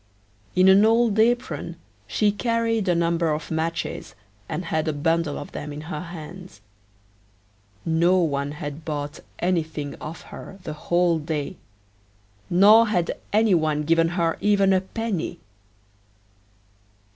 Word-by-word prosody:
In 185 +1 +5
an 190 +2 +7
old 225 -1 +3
apron 240 +2 +1 0.3
she 210 -1 +2
carried 230 -1 0
a 175 - +3
number 170 0 +1
of 150 +2 -4
matches, 160 -8 -3 0.3
and 180 - -3
had 160 -1 -1
a 155 - 0
bundle 165 0 0
of - - -8
them 150 - -6
in 145 +1 -7
her 155 -1 -5
hands. 175 - -10 1.3
No 170 +3 +3
one 145 -4 0
had 150 0 -7
bought 145 -1 -4 0.2
anything 160 -5 -1
of 160 +2 -7
her 195 - -9
the 155 - -5
whole 170 +2 +1
day, 155 +2 -4 0.9
nor 210 +6 +7
had 180 -5 0 0.2
any 215 -1 +4
one 155 -3 +1
given 165 +2 +2
here 165 -2 0
even 200 -2 +3
a 185 - +3
penny. 195 -4 -4
170 Hz, 135 wpm, -24 LUFS, 155-195 Hz, 1.3 s, an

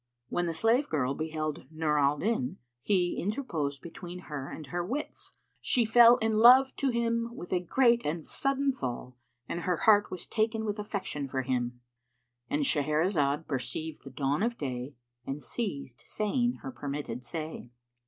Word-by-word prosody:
When 175 0 0
the 165 - -2
slave 230 - +2
girl 135 -4 0
beheld 155 0 -3
Nur 155 -1 0
al 140 +1 +3
Din 230 - -1 0.2
he 180 -1 +1
interposed 165 - -2
between 175 +1 -8
her 140 -2 -4
and 155 - -7
her 175 +6 -3
wits; 275 - -4 0.3
she 240 -2 +2
fell 235 +2 +8
in 220 -1 +1
love 260 +3 +8
to 275 - +1
him 235 -1 0
with 175 - -6
a 180 - +3
great 235 +6 +3
and 155 +1 -2
sudden 275 0 +1
fall 125 - -5 0.3
and 170 - -3
her 180 0 0
heart 205 -2 +6
was 185 - -5
taken 220 0 0
with 210 0 -2
affection 195 -9 -3
for 130 -1 -2
him;—And 120 - -5
Shahrazad 150 - +1
perceived 145 +4 -4
the - - -9
dawn 135 +4 -1
of 235 +2 0
day 130 0 -4 0.3
and 135 +2 -3
ceased 145 - -4
saying 240 +3 0
her 135 - -5
permitted 130 -1 -5
say. 155 0 -6
165 Hz, 160 wpm, -30 LUFS, 140-225 Hz, 0.3 s, fell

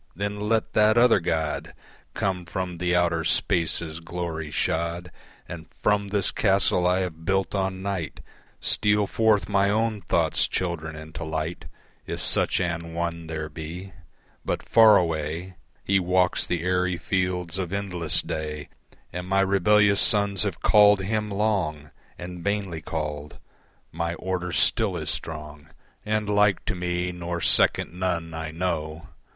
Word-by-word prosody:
Then 100 +2 -3
let 110 +1 0
that 110 +1 +4
other 120 -3 +5
God 80 -3 -2 0.4
Come 95 -2 -1
from 90 -1 -4
the 90 0 +1
outer 85 -2 +1
spaces 80 0 0
glory 80 -2 -5
shod, 85 +3 -2 0.4
And 80 -2 -8 0.2
from 105 -1 +2
this 100 -2 0
castle 95 -3 +2
I 90 +1 +2
have 80 -3 -5
built 95 +2 0
on 95 -1 -2
Night 95 -6 -4 0.4
Steal 105 0 +2
forth 110 0 +2
my 100 -1 +2
own 110 0 0
thought's - - +1
children 80 -4 -3
into 80 +1 -8
light, 80 +2 -4 0.4
If - - -4
such - - +2
an 85 -2 -3
one 85 -1 -3
there 80 -1 -4
be. 85 +5 -8 0.5
But - - -3
far 110 -2 +7
away 80 +2 -2 0.3
He 100 0 +3
walks 90 0 +1
the 85 -2 -2
airy 90 0 0
fields 90 -1 -2
of 90 -2 -3
endless 90 -5 0
day, 75 -1 -5 0.4
And 90 +1 -5
my 95 +1 +2
rebellious 100 +1 +4
sons 100 -4 +3
have - - -2
called 105 -1 +6
Him 105 +2 -2
long 95 -8 -1 0.3
And 90 0 -8
vainly 100 -5 -2
called. 75 -2 -5 0.5
My 85 +1 -3
order 90 0 -3
still - - +2
is - - -2
strong 75 -1 -6 0.4
And 105 0 -1
like 105 -2 +2
to - - -1
me 90 0 -2
nor 85 0 -4
second 80 - +4
none 90 -2 -2
I 80 -1 -5
know. 80 -1 -4
90 Hz, 145 wpm, -25 LUFS, 80-100 Hz, 0.5 s, far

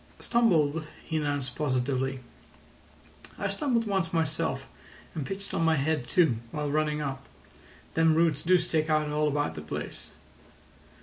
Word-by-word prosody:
"Stumbled," 165 -10 +2 0.2
he 160 - -1
announced 145 -4 -1
positively. 130 -1 0 1.2
"I - - -1
stumbled 245 -7 +1
once 190 -5 0
myself, 160 -4 -1 0.5
and 150 -5 -4
pitched 200 +1 -5
on - - 0
my 165 -1 +4
head 150 -3 0
too, 160 -9 +3
while 150 +2 -2
running 150 0 +1
up. 135 -2 -4 0.7
Them 165 -1 +4
roots 165 -3 +3
do 185 +2 +5
stick 160 -2 0
out 155 -1 +2
all 150 0 +1
about 145 0 0
the 75 - -7
place. 75 - -6
155 Hz, 140 wpm, -28 LUFS, 140-165 Hz, 1.2 s, do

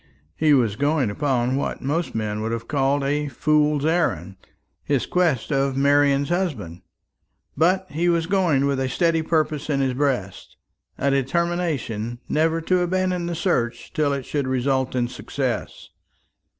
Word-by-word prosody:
He 155 -1 +2
was 115 -6 +1
going 145 -5 +1
upon 130 0 0
what 140 - -3
most 155 +3 -2
men 105 -1 -2
would 110 +1 -2
have 115 0 -4
called 140 -1 +1
a 145 +2 0
fool's 150 +2 +1
errand 100 - 0 0.5
his 140 -5 0
quest 170 -10 0
of 135 -1 +1
Marian's 140 0 +3
husband; 130 - -2 0.7
but 185 +5 +2
he 170 +4 +1
was 170 -1 +1
going 170 -7 +2
with 140 -1 0
a 130 -1 -1
steady 165 +4 +1
purpose 155 -2 -1
in 140 -2 +1
his 135 -2 +1
breast 125 -8 -2 0.4
a 140 - +1
determination 140 -6 -1
never 160 +2 +1
to 180 +3 +1
abandon 180 0 0
the 170 - -3
search 120 -9 -1
till 155 -5 +1
it 140 -2 -3
should 140 -3 -2
result 130 0 0
in 120 -1 +1
success. - - -4
145 Hz, 150 wpm, -23 LUFS, 130-165 Hz, 0.7 s, Marian's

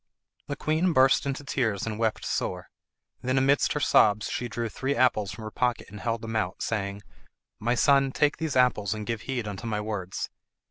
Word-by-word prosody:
The - - -3
queen 160 +3 +1
burst 135 +1 +4
into 140 +1 -3
tears 110 -7 -1
and 110 -1 -4
wept 110 -2 0
sore; 90 0 -3 0.5
then 130 +1 0
amidst 135 +2 +3
her 150 - -1
sobs 105 -6 +4
she 125 - -2
drew 120 0 -3
three 135 +6 -2
apples 110 -7 +2
from 110 - -8
her 110 - -6
pocket 125 -4 -1
and 105 - -8
held 115 0 -2
them 110 0 -4
out, 100 -5 -1
saying, 100 -2 -2 0.6
"My 120 +3 +1
son, 135 +1 +4
take 145 +2 +2
these 160 -4 -2
apples 115 -5 +2
and 105 -1 -5
give 115 -1 -3
heed 125 -5 -3
unto 105 +3 -5
my 105 -2 -1
words. 105 -4 -4
115 Hz, 195 wpm, -27 LUFS, 105-130 Hz, 0.6 s, burst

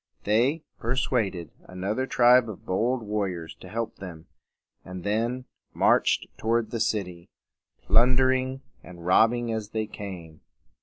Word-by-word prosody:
They 125 +10 +2 0.2
per 120 +3 -1
suad 120 -7 0
ed 85 -4 -8
another 100 +8 -3
tribe 125 -1 +5
of 105 - -9
bold 120 +6 0
war 105 -1 -1
riors 85 -3 -7
to 90 - -11
help 115 +2 -4
them, 85 -4 -9 0.6
and 90 -1 -8
then 115 +5 -1 0.3
marched - - +3
toward 115 0 0
the 115 - -2
city, 90 -6 -2 0.5
plun 125 +3 +4
der 130 0 +4
ing 130 +1 -1 0.2
and 85 -2 -12
robbing 115 +5 +3
as 110 -2 -4
they 110 0 -2
came. 90 -7 -9
110 Hz, 150 wpm, -26 LUFS, 95-120 Hz, 0.6 s, tribe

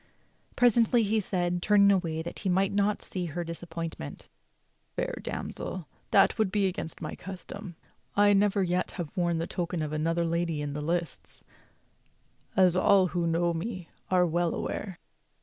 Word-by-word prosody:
Presently 235 -1 +4
he 215 +1 +2
said, 180 -3 -1
turning 200 0 +5
away 165 -4 0
that 170 - -7
he 195 - -2
might 190 +2 +2
not 205 +1 +1
see 180 -2 -3
her 175 +3 -3
disappointment: 165 - -6 0.7
"Fair - - -2
damsel, 185 -4 -5 0.2
that 200 +3 +4
would 215 -4 +2
be 205 -1 +2
against 180 -3 -4
my - - -4
custom. 190 0 -8 0.4
I 205 0 +5
never 200 0 +3
yet 180 0 0
have 170 -2 -5
worn 175 -3 +1
the 165 - -1
token 175 -2 -3
of 155 0 -4
any 155 0 -1
lady 170 -1 0
in 145 -1 -3
the 150 - -4
lists, 170 0 -3 1.1
as 185 -2 +5
all 190 0 +5
who 170 0 -1
know 170 +1 +1
me 180 0 -5 0.2
are 180 -1 +4
well 175 0 0
aware." 190 -4 -4
180 Hz, 160 wpm, -28 LUFS, 170-195 Hz, 1.1 s, turning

